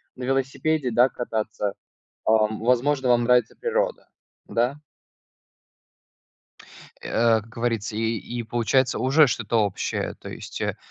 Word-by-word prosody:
на 130 Hz, -, -8 dB
велосипеде, 135 Hz, +2 st, 0 dB
да, 120 Hz, +3 st, +5 dB
кататься, 110 Hz, -4 st, -3 dB, 0.5 s
ам, 110 Hz, 0 st, +2 dB
возможно, 130 Hz, +3 st, +2 dB
вам 120 Hz, -1 st, +4 dB
нравится 125 Hz, 0 st, +3 dB
природа, -, -, -1 dB, 0.4 s
да? 125 Hz, +6 st, -1 dB, 2.2 s
Э, 115 Hz, -1 st, +2 dB
как 110 Hz, -, -16 dB
говорится, 115 Hz, -2 st, -2 dB
и 115 Hz, 0 st, 0 dB
и 120 Hz, +5 st, -5 dB
получается, 120 Hz, +3 st, +1 dB
уже 140 Hz, +4 st, +5 dB
что-то 115 Hz, -3 st, +1 dB
общее, 100 Hz, -2 st, -3 dB
то -, -, -9 dB
есть, -, -, -8 dB
э, -, -, -1 dB
120 Hz, 120 wpm, -24 LUFS, 110-130 Hz, 2.2 s, да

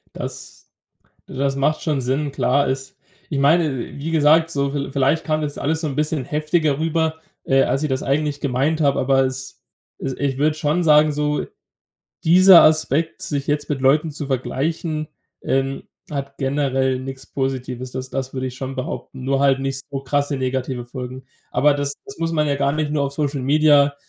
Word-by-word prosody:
Das -, -, -8 dB, 0.6 s
du -, -, -11 dB
das 135 Hz, +1 st, 0 dB
macht 145 Hz, +3 st, 0 dB
schon 150 Hz, -4 st, 0 dB
Sinn. 135 Hz, +3 st, -1 dB
Klar, 140 Hz, +2 st, +1 dB
ist 135 Hz, 0 st, -4 dB, 0.4 s
ich 140 Hz, -, 0 dB
meine, 145 Hz, 0 st, +3 dB, 0.2 s
wie 160 Hz, +3 st, -4 dB
gesagt, 160 Hz, +1 st, +4 dB
so 140 Hz, -3 st, 0 dB
viel 140 Hz, -1 st, -3 dB
vielleicht 140 Hz, +4 st, +1 dB
kam 155 Hz, -1 st, 0 dB
das 145 Hz, -1 st, -4 dB
alles 160 Hz, +2 st, -1 dB
so 155 Hz, -, -1 dB
'n 140 Hz, -, -4 dB
bisschen 150 Hz, -3 st, -1 dB
heftiger 150 Hz, 0 st, 0 dB
rüber, 160 Hz, 0 st, 0 dB, 0.3 s
äh, 135 Hz, 0 st, +3 dB
als 135 Hz, -, 0 dB
ich 155 Hz, -, 0 dB
das 130 Hz, 0 st, -1 dB
eigentlich 145 Hz, +1 st, -1 dB
gemeint 140 Hz, +4 st, 0 dB
habe. 140 Hz, -2 st, +2 dB
Aber 135 Hz, 0 st, +3 dB
es 130 Hz, 0 st, -5 dB, 0.4 s
es 135 Hz, -1 st, -3 dB
ich 135 Hz, -2 st, -1 dB
würde 150 Hz, +2 st, +2 dB
schon 155 Hz, +2 st, 0 dB
sagen, 150 Hz, -1 st, +5 dB
so 150 Hz, 0 st, -1 dB, 0.8 s
dieser 180 Hz, +2 st, +8 dB
Aspekt, 155 Hz, +3 st, +2 dB
sich 145 Hz, -7 st, -3 dB
jetzt 145 Hz, 0 st, -1 dB
mit 145 Hz, -3 st, -2 dB
Leuten 150 Hz, +4 st, +3 dB
zu 145 Hz, 0 st, -5 dB
vergleichen, 155 Hz, +4 st, -2 dB, 0.3 s
ähm, 135 Hz, 0 st, -1 dB, 0.3 s
hat 140 Hz, -1 st, -5 dB
generell 135 Hz, -1 st, 0 dB
nix 135 Hz, 0 st, -8 dB
Positives. 130 Hz, -2 st, -3 dB
Das 130 Hz, 0 st, -5 dB
das 135 Hz, -1 st, -4 dB
würde 130 Hz, 0 st, -2 dB
ich 125 Hz, -, -6 dB
schon 135 Hz, +1 st, -5 dB
behaupten, 130 Hz, 0 st, -6 dB
nur 135 Hz, 0 st, +1 dB
halt 135 Hz, -1 st, +4 dB
nicht 135 Hz, 0 st, -2 dB
so 135 Hz, -1 st, -3 dB
krasse 145 Hz, +1 st, -1 dB
negative 130 Hz, -1 st, -2 dB
Folgen. 130 Hz, +1 st, -7 dB, 0.3 s
Aber 140 Hz, +3 st, +3 dB
das 145 Hz, 0 st, -2 dB
das 200 Hz, -, -10 dB
muss 165 Hz, 0 st, -1 dB
man 150 Hz, -2 st, +1 dB
ja 145 Hz, -, +1 dB
gar 140 Hz, 0 st, +1 dB
nicht 155 Hz, -1 st, -1 dB
nur 150 Hz, -2 st, +1 dB
auf 140 Hz, -, -3 dB
Social 145 Hz, -2 st, -1 dB
Media, 145 Hz, 0 st, +4 dB
140 Hz, 190 wpm, -21 LUFS, 135-155 Hz, 0.8 s, dieser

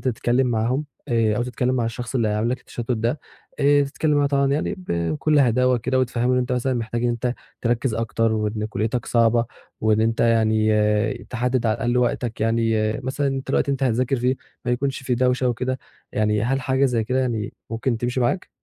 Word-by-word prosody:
تتكلِّم 125 Hz, +1 st, +1 dB
معاهم 120 Hz, +5 st, 0 dB, 0.2 s
آآ 115 Hz, -3 st, +2 dB
أو 120 Hz, -, +1 dB
تتكلِّم 125 Hz, +1 st, -1 dB
مع 120 Hz, -2 st, 0 dB
الشخص 120 Hz, +2 st, -5 dB
اللي 115 Hz, -4 st, +2 dB
عامل 105 Hz, +2 st, 0 dB
لك 130 Hz, 0 st, -2 dB
التشتُّت 120 Hz, +1 st, -7 dB
ده، 120 Hz, +5 st, -1 dB, 0.4 s
آآ 145 Hz, 0 st, +5 dB
تتكلِّم 145 Hz, +2 st, 0 dB
معاه 145 Hz, -, +3 dB
طبعًا 140 Hz, -1 st, +2 dB
يعني 150 Hz, -, -1 dB
ب 185 Hz, -, -13 dB, 0.3 s
بكل 150 Hz, -, +2 dB
هداوة 125 Hz, -1 st, +3 dB
كده 130 Hz, +3 st, 0 dB
وتفهِّمه 125 Hz, 0 st, +1 dB
إن -, -, +2 dB
أنت 125 Hz, 0 st, -1 dB
مثلًا 125 Hz, +1 st, 0 dB
محتاج 115 Hz, 0 st, -2 dB
إن -, -, +3 dB
أنت 120 Hz, +1 st, -1 dB, 0.3 s
تركِّز 120 Hz, 0 st, 0 dB
أكتر 115 Hz, 0 st, 0 dB
وإن 105 Hz, 0 st, -1 dB
كُلّيتك 115 Hz, +2 st, -2 dB
صعبة 115 Hz, 0 st, +3 dB, 0.4 s
وإن 110 Hz, 0 st, +2 dB
أنت 115 Hz, +1 st, +1 dB
يعني 110 Hz, -2 st, +3 dB, 0.6 s
تحدِّد 125 Hz, 0 st, 0 dB
على 110 Hz, -, +2 dB
الأقل 120 Hz, +1 st, 0 dB
وقتك، 120 Hz, -2 st, -1 dB
يعني 115 Hz, -1 st, +1 dB
مثلًا 135 Hz, +3 st, -2 dB
أنت 135 Hz, -1 st, -2 dB
الوقت 140 Hz, -, +1 dB
اللي 140 Hz, -, +1 dB
هتذاكر 130 Hz, +1 st, +1 dB
فيه 125 Hz, +2 st, +1 dB, 0.3 s
ما 120 Hz, -, -1 dB
يكونش 135 Hz, +2 st, -2 dB
في 130 Hz, -1 st, 0 dB
دوشة 125 Hz, +1 st, +2 dB
وكده، 130 Hz, +2 st, -2 dB, 0.3 s
يعني 105 Hz, 0 st, +1 dB
هل 135 Hz, +3 st, 0 dB
حاجة 130 Hz, +1 st, +1 dB
زي 120 Hz, -4 st, +1 dB
كده 125 Hz, +3 st, 0 dB
يعني 115 Hz, -5 st, -2 dB, 0.2 s
ممكن 115 Hz, +1 st, -1 dB
تمشي 120 Hz, +2 st, -1 dB
معاك؟ 125 Hz, +10 st, 0 dB
120 Hz, 195 wpm, -23 LUFS, 115-130 Hz, 0.6 s, آآ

